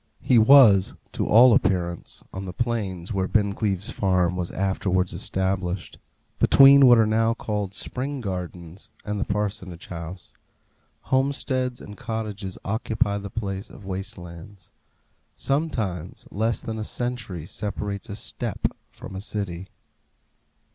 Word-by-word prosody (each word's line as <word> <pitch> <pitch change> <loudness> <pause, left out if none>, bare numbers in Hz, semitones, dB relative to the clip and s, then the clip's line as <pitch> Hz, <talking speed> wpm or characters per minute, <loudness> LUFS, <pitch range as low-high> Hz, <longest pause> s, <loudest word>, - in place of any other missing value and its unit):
He 125 - +5
was, 110 -5 +7 0.2
to - - -2
all 120 +3 +7
appearance, 85 -4 -1
on 95 +1 -5
the 90 - -6
plains 105 -5 -2
where 95 -1 0
Bincleaves 100 -1 0
Farm 90 -3 +1
was 90 -1 -3
afterwards 95 -1 0
established, 95 -1 -2 0.4
between 140 0 +8
what 120 -1 +8
are 110 - +5
now 115 +1 +2
called 105 -4 -3
Spring 135 +2 -4
Gardens 90 -4 -6 0.2
and 105 0 -2
the - - +1
Parsonage 100 -4 -3
House. 85 +1 -8 0.7
Homesteads 130 -2 0
and 105 - -10
cottages 105 -4 -5
occupy 105 -1 0
the 100 0 -7
place 100 0 -4
of 100 - -13
waste 95 +3 -5
lands. 90 +3 -11 0.6
Sometimes 110 - -2
less 110 +3 -1
than 110 -1 -4
a - - -2
century 120 -9 -4
separates 100 +1 -5
a 100 - -5
steppe - - -3
from 95 - -10
a 95 - -5
city. 95 -4 -4
100 Hz, 130 wpm, -24 LUFS, 95-115 Hz, 0.7 s, between